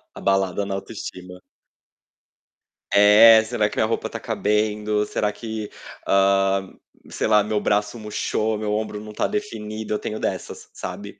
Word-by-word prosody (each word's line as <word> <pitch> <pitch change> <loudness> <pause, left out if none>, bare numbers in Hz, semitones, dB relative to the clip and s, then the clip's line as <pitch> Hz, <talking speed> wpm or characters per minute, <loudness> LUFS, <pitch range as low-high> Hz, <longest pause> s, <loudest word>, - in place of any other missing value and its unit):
abalada 95 0 0
na 100 - -4
autoestima. 90 -3 -8 1.5
É, 110 +2 +8
será 110 -2 0
que - - -10
minha - - +3
roupa 115 - -2
tá - - -6
cabendo? 105 0 0
Será 105 0 -1
que 110 -1 -6 0.4
ah, 95 0 +3 0.5
sei - - -2
lá, 105 -1 +4
meu 105 0 -1
braço 105 +3 0
murchou? 110 0 -2
Meu 105 0 -3
ombro 105 -1 -3
não 105 - -9
tá - - 0
definido? 110 - -4
Eu 105 - -1
tenho 110 - -5
dessas, - - -5
sabe. 100 +2 -8
105 Hz, 145 wpm, -22 LUFS, 100-110 Hz, 1.5 s, É